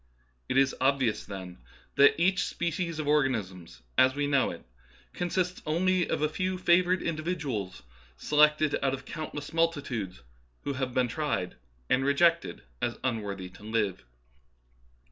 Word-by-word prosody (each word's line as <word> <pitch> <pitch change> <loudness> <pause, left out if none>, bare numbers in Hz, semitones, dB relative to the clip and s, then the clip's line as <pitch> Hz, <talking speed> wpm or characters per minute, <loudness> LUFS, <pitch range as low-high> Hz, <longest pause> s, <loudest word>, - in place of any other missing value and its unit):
It - - +1
is 135 0 +4
obvious, 130 -4 +1
then, 95 -3 -8 0.3
that 140 +3 +5
each 185 +2 +2
species 170 -1 -2
of 155 -2 -3
organisms, 95 - -1 0.2
as 130 +1 +5
we 145 0 0
know 140 -3 +2
it, - - -8 0.5
consists 180 +1 -1
only 180 +3 +1
of - - 0
a - - +4
few 185 +4 -2
favoured 180 0 +3
individuals 150 - -3 0.3
selected 150 - +3
out 135 -1 +1
of 135 - -12
countless 155 -2 -6
multitudes 140 - -1 0.4
who 140 - -2
have 130 -1 -3
been 130 -1 +3
tried 145 - -2 0.3
and 130 - +2
re 140 +1 +2
jected 170 - +2 0.2
as 120 - -1
unworthy 100 -7 -3
to 95 +2 -17
live. 105 -4 -1
140 Hz, 145 wpm, -29 LUFS, 115-165 Hz, 0.5 s, that